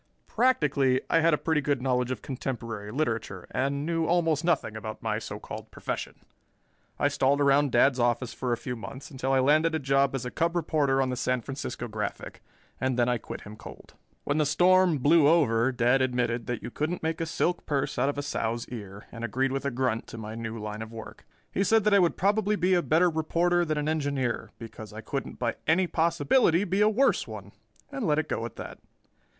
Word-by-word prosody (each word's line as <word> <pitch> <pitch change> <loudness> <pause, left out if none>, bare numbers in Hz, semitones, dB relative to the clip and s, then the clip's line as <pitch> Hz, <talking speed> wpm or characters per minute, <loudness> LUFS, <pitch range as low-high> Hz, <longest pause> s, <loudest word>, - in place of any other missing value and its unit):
Practically 145 - +2
I - - +5
had 165 +1 +4
a 150 - +3
pretty 160 -1 0
good 140 -2 0
knowledge 125 -1 0
of 130 -5 -4
contemporary 115 -5 -5
literature 115 - -2
and 140 +2 -1
knew 165 -1 0
almost 165 -3 +2
nothing 165 -10 0
about 110 0 -7
my - - -1
so - - -6
called - - -8
profession. - - -5 0.8
I - - +2
stalled 140 +2 +2
around 140 0 +3
Dad's 130 +2 +4
office 120 0 0
for 125 -2 -3
a 120 - +1
few 125 +1 -5
months 130 +6 -9
until 135 -1 -2
I 135 - +4
landed 155 +4 +3
a - - +2
job 135 -1 +1
as 125 - -4
a 125 - -4
cub 170 +2 0
reporter 145 -5 +1
on 130 - -2
the - - -2
San 125 0 0
Francisco 135 -1 -5
Graphic 105 -2 -5 0.4
and 130 -1 0
then 120 -1 +3
I 120 -1 +1
quit - - -8
him 105 0 -10
cold. - - -12 0.3
When 145 +2 0
the 155 - +3
storm 180 +1 +4
blew 145 +3 +5
over, 130 -7 +3
Dad 125 +2 +2
admitted 120 -2 0
that 120 -2 -3
you - - -6
couldn't 160 +7 -3
make 160 +1 -1
a 165 - -1
silk 175 +2 -1
purse 145 -1 -1
out 135 - +2
of 145 - -3
a 145 - -2
sow's 115 -4 -2
ear 105 -4 -8
and 115 -1 -8
agreed 130 +4 0
with 135 +1 -3
a - - +2
grunt 125 -3 -1
to - - -9
my 110 -1 -6
new 115 0 -5
line 105 0 -5
of 110 0 -7
work. 115 -1 -10 0.2
He 195 - 0
said 220 +2 +3
that 210 0 +3
I 200 - +7
would 175 -2 +2
probably 210 +2 +2
be 185 -1 +2
a 175 - +4
better 170 +2 +3
reporter 170 +2 +1
than 155 -2 -1
an 150 0 -1
engineer 140 -5 -1
because 110 -1 -10
I 110 - -7
couldn't 135 +5 -5
by 120 -2 -2
any 175 +4 +4
possibility 170 - +2
be 195 +1 0
a 210 - +5
worse 255 +6 +2
one, - - -9 0.4
and 270 -7 -3
let 150 -1 +2
it 155 0 0
go 115 - -2
at 120 - -15
that. - - -8
135 Hz, 220 wpm, -27 LUFS, 120-160 Hz, 0.8 s, I